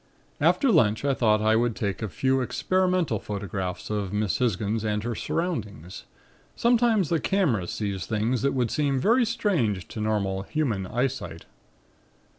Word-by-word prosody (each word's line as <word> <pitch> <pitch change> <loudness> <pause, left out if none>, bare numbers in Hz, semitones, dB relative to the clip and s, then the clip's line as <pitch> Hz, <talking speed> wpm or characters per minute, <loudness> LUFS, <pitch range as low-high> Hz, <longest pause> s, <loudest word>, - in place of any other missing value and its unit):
"After 275 -4 +3
lunch 110 - +3
I 140 - +3
thought 110 -4 +2
I 110 +1 +4
would 120 -1 +1
take 100 -1 -3
a 110 - -2
few 130 +9 +1
experimental 180 - 0
photographs 100 -2 -5
of 100 -3 -2
Miss 105 -4 -1
Hisgins 110 -2 0
and 105 -1 -1
her 120 +1 -2
surroundings. 105 - -4 0.5
Sometimes 235 -6 +3
the 165 - +1
camera 145 - +1
sees 100 -2 -3
things 110 +2 0
that 140 - +1
would 125 -3 0
seem 140 -3 +1
very 235 - +3
strange 165 - 0
to 110 - -6
normal 100 -3 0
human 110 -6 -2
eyesight. 125 -7 -3
110 Hz, 150 wpm, -26 LUFS, 105-150 Hz, 0.5 s, I